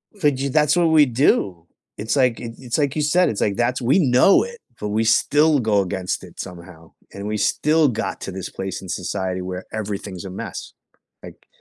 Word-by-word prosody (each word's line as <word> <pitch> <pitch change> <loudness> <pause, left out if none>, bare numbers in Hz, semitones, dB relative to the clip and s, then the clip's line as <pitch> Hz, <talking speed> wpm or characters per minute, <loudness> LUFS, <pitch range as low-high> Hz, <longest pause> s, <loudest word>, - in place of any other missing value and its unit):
F 150 -8 +2
j 135 +1 -2
that's 150 +2 +3
what 170 -2 +3
we 155 -2 +6
do. 100 - +1 0.3
It's 110 +6 -2
like 125 -4 +2
i 115 - -6
it's 125 0 -3
like 145 -2 0
you 155 - 0
said, 175 +5 +3
it's, 105 - -3
like 100 -2 +1
that's 125 +2 0
we 135 +10 +3
know 130 +6 +5
it, 475 0 -9 0.2
but 105 - -3
we 110 +2 +1
still 145 +6 +3
go 105 -4 +2
against 95 -1 -3
it - - -14
somehow 85 -2 -10 0.2
and 100 +1 -6
we 105 0 -2
still 155 +7 +2
got 115 -3 -3
to 95 - -5
this 95 -1 -6
place 95 0 -5
in 95 - -10
society 95 +1 -3
where 90 0 -6
everything's 100 -3 -5
a - - -6
mess, 95 - -7 0.5
like, - - -13
115 Hz, 205 wpm, -21 LUFS, 95-145 Hz, 0.5 s, we